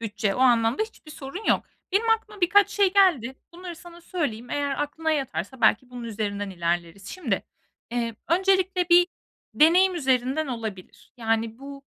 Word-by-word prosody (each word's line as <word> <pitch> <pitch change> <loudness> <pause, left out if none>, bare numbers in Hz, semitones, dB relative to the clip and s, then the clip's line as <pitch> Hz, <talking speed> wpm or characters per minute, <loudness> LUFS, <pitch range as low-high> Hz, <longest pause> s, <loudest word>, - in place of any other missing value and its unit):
bütçe. 210 -2 -2
O - - -5
anlamda 235 - +3
hiçbir 435 -8 -10
sorun 300 +8 -8
yok. - - +2 0.3
Benim 430 +4 +1
aklıma 440 -2 -1
birkaç 400 +3 +4
şey 395 -2 +2
geldi. 340 - +3 0.2
Bunları 350 0 -8
sana 345 +1 -13
söyleyeyim, 280 -10 -4
eğer 285 -1 -1
aklına 320 +2 -3
yatarsa 260 - -3
belki 240 +2 +3
bunun 245 -1 -8
üzerinden 205 -3 -3
ilerleriz. 175 +1 -3
Şimdi, 265 - -2 0.5
eee, 235 -1 -2
öncelikle 375 0 +2
bir 350 0 +6 0.5
deneyim 360 +5 +5
üzerinden 265 0 0
olabilir. 220 -7 -7
Yani, 225 -1 -1
bu 275 0 -10
275 Hz, 150 wpm, -25 LUFS, 225-355 Hz, 0.5 s, bir